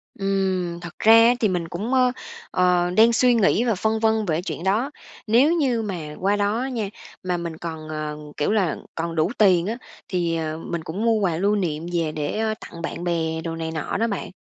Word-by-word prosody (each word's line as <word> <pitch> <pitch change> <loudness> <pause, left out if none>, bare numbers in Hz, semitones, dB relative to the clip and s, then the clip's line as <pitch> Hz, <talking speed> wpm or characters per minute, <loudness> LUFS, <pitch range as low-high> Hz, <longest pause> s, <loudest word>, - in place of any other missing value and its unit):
Ừm, 190 -3 -1
thật 175 0 -10
ra 220 +1 +6
á, 230 +1 +7
thì 220 - +3
mình 175 -3 -2
cũng, 210 +10 -4
ơ, 255 -1 +4 0.4
ờ, 180 -1 +2
đang 230 +2 +6
suy 250 +1 +4
nghĩ 225 0 +3
và 230 -4 +1
phân 220 +3 0
vân 220 -1 +2
về 165 -2 0
chuyện 180 -2 -5
đó, 220 +9 +1 0.4
nếu 260 +9 +5
như 260 -8 +1
mà 170 -8 -5
qua 200 +2 +2
đó 205 +3 0
á 265 - -2
nha, 225 -6 -3 0.3
mà 180 -1 -1
mình 170 -2 -5
còn, 160 -2 -7
ờ, 155 -1 -4 0.2
kiểu 150 - +1
là, 190 -8 +1 0.2
còn 165 0 -3
đủ 160 +6 +1
tiền 185 -5 +4
á, 225 - -1 0.3
thì, 170 -3 0
ờ, 155 -1 -3
mình 165 0 -4
cũng 180 +6 -4
mua 230 - +4
quà 175 -5 0
lưu 200 +3 +2
niệm 165 -4 -2
về 165 -2 0
để 210 +9 -1
tặng 170 - -10
bạn 170 +1 -5
bè 160 -2 -1
đồ 165 -1 -4
này 160 0 -4
nọ 160 -2 -3
đó 230 - +1
bạn. 200 -4 -4
185 Hz, 220 wpm, -23 LUFS, 165-220 Hz, 0.4 s, á